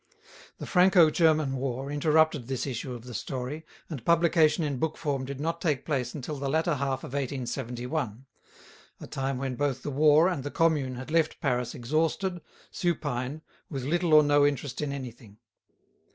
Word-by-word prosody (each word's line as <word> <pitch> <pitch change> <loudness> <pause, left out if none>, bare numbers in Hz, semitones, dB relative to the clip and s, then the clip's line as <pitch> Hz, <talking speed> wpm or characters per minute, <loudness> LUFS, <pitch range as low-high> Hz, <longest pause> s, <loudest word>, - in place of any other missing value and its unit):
The - - -7
Franco 180 -3 +5
German 155 -5 +2
war 135 +1 -3
interrupted 155 -3 +2
this 130 -2 -2
issue 125 -1 -4
of 115 - -10
the 125 0 -9
story, 130 +7 -5 0.2
and 140 -9 -7
publication 170 0 +3
in 140 -4 -2
book 160 +1 -1
form 140 -4 -2
did 135 0 -6
not 165 +3 -2
take 150 -7 0
place 130 -5 -2
until 150 +1 -5
the 135 0 -3
latter 160 +3 +1
half 135 -2 -2
of - - -8
1871, 130 -2 -3 0.7
a - - -8
time 135 -1 -3
when 135 0 -3
both 135 0 -1
the 145 - -3
war 150 +4 +5
and 175 -8 -2
the 145 - -3
Commune 150 -5 +1
had 130 +4 -8
left 160 -1 +1
Paris 125 -2 -1
exhausted, 160 +7 -1 0.3
supine, 150 -5 -2 0.3
with 135 -4 -4
little 165 +3 +2
or 155 - +8
no 145 0 +4
interest 145 -1 -1
in 150 -2 -2
anything. 120 -6 -8
140 Hz, 170 wpm, -28 LUFS, 130-155 Hz, 0.7 s, or